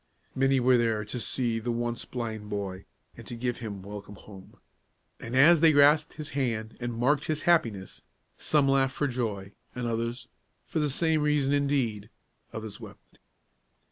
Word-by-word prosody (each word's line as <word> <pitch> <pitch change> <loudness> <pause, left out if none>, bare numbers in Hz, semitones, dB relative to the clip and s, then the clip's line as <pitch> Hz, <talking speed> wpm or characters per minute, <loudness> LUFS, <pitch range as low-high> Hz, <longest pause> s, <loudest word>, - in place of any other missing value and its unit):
Many 135 0 +2
were 125 0 +4
there 110 -2 0
to 120 +4 -5
see 115 -1 -1
the 120 +2 -3
once 120 0 -3
blind 110 -4 -5
boy, 95 -2 -4 0.3
and 120 - -9
give 120 -1 -1
him 100 -5 -7
welcome 105 0 -9
home. 95 -2 -14 0.6
And 115 +2 -6
as 155 +4 +6
they 165 -1 +7
grasped 145 +1 +5
his 150 -1 -6
hand, 115 -5 -2
and 120 -1 -4
marked 140 +4 +2
his 155 -1 -2
happiness, 115 - +1 0.3
some 145 -3 +2
laughed 135 -1 +2
for 145 - 0
joy, 110 -7 -3 0.2
and 125 -1 -3
others, 115 +2 -3 0.4
for 160 - -3
the 150 -1 +1
same 160 +2 +1
reason 150 -2 +2
indeed, 130 -8 0 0.4
others 110 -2 -7
wept. - - -14
120 Hz, 160 wpm, -28 LUFS, 110-140 Hz, 0.6 s, they